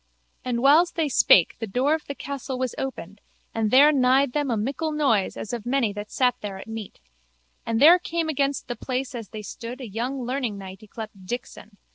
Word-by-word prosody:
And 240 -2 -2
whiles 310 +6 +5
they 325 -2 0
spake 185 -8 +5
the 225 - -4
door 255 +8 +1
of 315 - -2
the 280 - -5
castle 275 -2 -5
was 255 -1 -2
opened 205 -7 -6 0.3
and 220 -1 0
there 280 +6 +7
nighed 265 -1 +3
them 290 -2 0
a 230 - 0
mickle 280 +9 -2
noise 270 -10 +1
as 220 - -6
of 235 -3 -4
many 245 -4 0
that 205 +1 -7
sat 250 -1 +2
there 200 -2 -5
at 190 - -9
meat. 225 -2 -8 0.7
And 225 -1 0
there 335 +6 +8
came 335 -2 -2
against 280 -2 -1
the 240 - -4
place 255 +2 -3
as 230 -5 -7
they 215 -1 -8
stood 235 +4 -7
a 255 - -6
young 245 +5 -3
learningknight 205 -8 -4
yclept 215 0 -8 0.2
Dixon. 225 -3 -7
250 Hz, 200 wpm, -24 LUFS, 220-275 Hz, 0.7 s, there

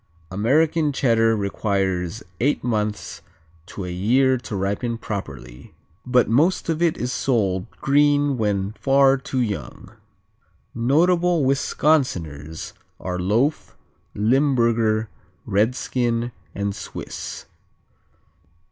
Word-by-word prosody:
American 150 - +2
Cheddar 115 -5 +2
requires 100 -1 -1
from - - -29
eight 140 +5 +1
months 105 -5 -2 0.5
to 95 - -6
a 90 - -5
year 125 +9 +3
to 120 -4 -6
ripen 100 +5 -2
properly, 70 - -7 0.3
but 125 -1 +3
most 160 - +2
of 160 0 -1
it 170 -2 +2
is 125 +1 -2
sold 100 -6 0
green 145 0 +2
when 100 -4 -1
far 135 +4 +3
too 130 -1 -3
young. 100 - -5 0.8
Notable 170 +6 +2
Wisconsiners 90 - 0 0.3
are 90 -1 -4
Loaf, 115 - 0 0.4
Limburger, 115 -2 +2 0.4
Redskin 120 +3 0 0.2
and 100 0 -2
Swiss. - - -7
115 Hz, 100 wpm, -22 LUFS, 100-135 Hz, 0.8 s, year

